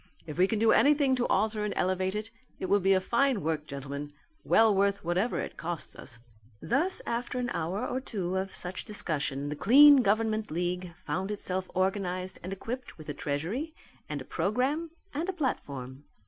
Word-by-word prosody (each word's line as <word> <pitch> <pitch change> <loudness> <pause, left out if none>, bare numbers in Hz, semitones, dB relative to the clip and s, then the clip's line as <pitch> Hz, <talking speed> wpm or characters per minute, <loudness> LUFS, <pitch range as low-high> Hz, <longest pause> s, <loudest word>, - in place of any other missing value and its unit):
If 155 +1 -7
we 185 - +6
can 220 - 0
do 225 +1 +4
anything 285 -2 +4
to 245 - +1
alter 215 +1 +1
and 210 - -2
elevate 185 +1 0
it, 215 +2 -4 0.3
it - - -3
will 200 +2 +3
be 195 0 +4
a - - +4
fine 235 +4 +1
work, 155 -1 -2
gentlemen, 140 +1 -6 0.3
well 225 -1 +5
worth 200 -1 +1
whatever 185 +7 0
it - - -5
costs 170 0 -5
us." 125 - -8 0.4
Thus 315 - +1
after 240 +1 -2
an 245 -1 -1
hour 170 +5 -2
or 255 - -2
two 190 -8 -3
of 190 0 -1
such 180 0 -3
discussion 145 -9 -2
the 150 - -3
Clean 285 - +8
Government 220 -1 +1
League 175 +1 -2
found 190 +2 -2
itself 190 -3 -2
organized 185 -1 -1
and 185 - -6
equipped 240 +6 -6
with 155 -2 -10
a - - -2
treasury 180 - -3 0.3
and 150 -2 -3
a - - -9
programme 255 - 0 0.2
and 320 +6 -2
a - - 0
platform. 140 - -4
195 Hz, 185 wpm, -29 LUFS, 170-235 Hz, 0.4 s, Clean